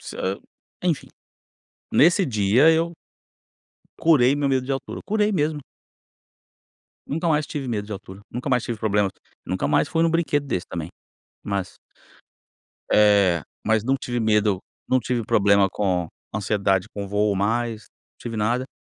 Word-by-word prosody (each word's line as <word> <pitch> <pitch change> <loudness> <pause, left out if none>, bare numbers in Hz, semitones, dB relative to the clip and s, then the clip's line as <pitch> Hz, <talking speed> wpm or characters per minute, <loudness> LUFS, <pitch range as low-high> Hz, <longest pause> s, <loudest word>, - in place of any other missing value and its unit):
Você - - -9 0.7
enfim, 170 -5 -1 0.8
nesse 175 +5 +5
dia 110 +4 +4
eu 165 +1 +1 1.1
curei 140 -5 +4
meu 145 -1 0
medo 130 -2 +1
de 135 - -3
altura, 135 - -4
curei 210 0 +1
mesmo. 155 -5 0 1.5
Nunca 165 +4 -2
mais 150 -3 +1
tive 140 -2 -4
medo 105 -4 -2
de - - -9
altura, 95 0 -10
nunca 125 +4 -4
mais 125 -2 +2
tive 120 - -4
problemas, 105 -2 +1 0.3
nunca 90 -7 -1
mais 75 - +2
fui 165 -1 +1
em - - +4
um - - +1
brinquedo 145 -4 +1
desse 95 -9 -3
também, 85 -2 -5 0.6
mas 100 -2 -3 1.1
Eh, 100 -5 +5 0.2
mas 110 0 +2
não 135 +3 +2
tive 120 -1 -3
medo, 105 -3 +2 0.3
não 130 - +3
tive 120 0 -2
problema 100 -1 +4
com 90 -3 -1 0.3
ansiedade 100 -2 0
com 100 -1 -5
voo 105 +1 +1
mais, 110 +3 -1 0.3
não - - -
tive 115 -2 -5
nada. 120 +5 0
115 Hz, 150 wpm, -23 LUFS, 100-140 Hz, 1.5 s, nesse